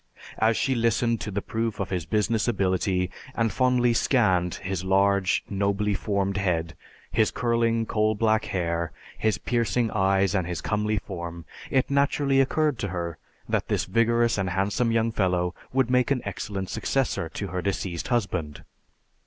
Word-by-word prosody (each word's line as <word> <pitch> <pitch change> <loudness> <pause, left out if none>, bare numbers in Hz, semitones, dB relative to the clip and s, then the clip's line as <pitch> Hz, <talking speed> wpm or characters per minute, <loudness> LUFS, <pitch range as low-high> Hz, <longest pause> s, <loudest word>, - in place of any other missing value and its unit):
As 110 0 +3
she 135 - +1
listened 115 -1 +1
to - - -4
the 100 0 -3
proof 115 -1 -2
of 100 - -3
his 90 -3 -2
business 110 +1 +1
ability 95 -4 0 0.2
and 115 -1 +1
fondly 125 -2 +3
scanned 95 -9 +2
his 95 -2 -4
large, 100 0 +2
nobly 100 +1 0
formed 100 0 -1
head, 85 -4 0 0.4
his 110 -1 +3
curling 115 -1 +1
coal 110 0 +1
black 110 0 +2
hair, 85 -2 -2 0.2
his 110 -4 0
piercing 120 +1 0
eyes, 95 -1 +2
and 95 -4 0
his 90 -2 -3
comely 105 0 0
form, 85 -4 -6 0.2
it 130 +1 +1
naturally 140 -1 +3
occurred 150 -1 +1
to 100 - -1
her 85 -3 -4 0.3
that - - -1
this - - 0
vigorous 115 0 +2
and 95 -1 0
handsome 100 +6 0
young 115 0 +2
fellow 90 -4 0 0.2
would 130 -1 +1
make 125 -1 +3
an 135 -3 0
excellent 100 -1 -4
successor 130 -11 -1
to 100 +3 -5
her 90 0 -3
deceased 95 -3 -3
husband. 95 - -2
105 Hz, 160 wpm, -26 LUFS, 95-115 Hz, 0.4 s, As